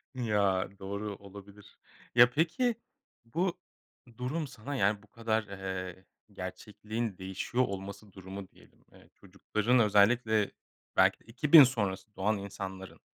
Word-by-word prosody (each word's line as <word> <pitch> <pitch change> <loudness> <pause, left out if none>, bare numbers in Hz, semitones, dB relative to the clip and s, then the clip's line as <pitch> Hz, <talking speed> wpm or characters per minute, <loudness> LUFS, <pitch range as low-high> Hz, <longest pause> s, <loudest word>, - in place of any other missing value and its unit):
Ya, 105 -6 +1
doğru, 100 +1 -4
olabilir. 100 +1 -14 0.4
Ya, 120 0 +8
peki 170 - +1 0.5
bu 170 +9 -1 0.6
durum 145 +5 -2
sana, 135 +2 -7
yani, 105 -3 +1
bu 105 - -20
kadar, 110 0 -1
eee, 95 -2 -6 0.3
gerçekliğin 105 +3 -5
değişiyor 95 +6 -1
olması 100 -1 -6
durumu 95 0 -9
diyelim, - - -23
eee, - - -19
çocukların 105 +5 0
özellikle 110 0 +3 0.4
belki - - +4
de - - -27
2000 145 +6 +7
sonrası 105 -5 -1
doğan 105 +3 +1
insanların, 95 -3 -7
105 Hz, 120 wpm, -31 LUFS, 95-120 Hz, 0.6 s, Ya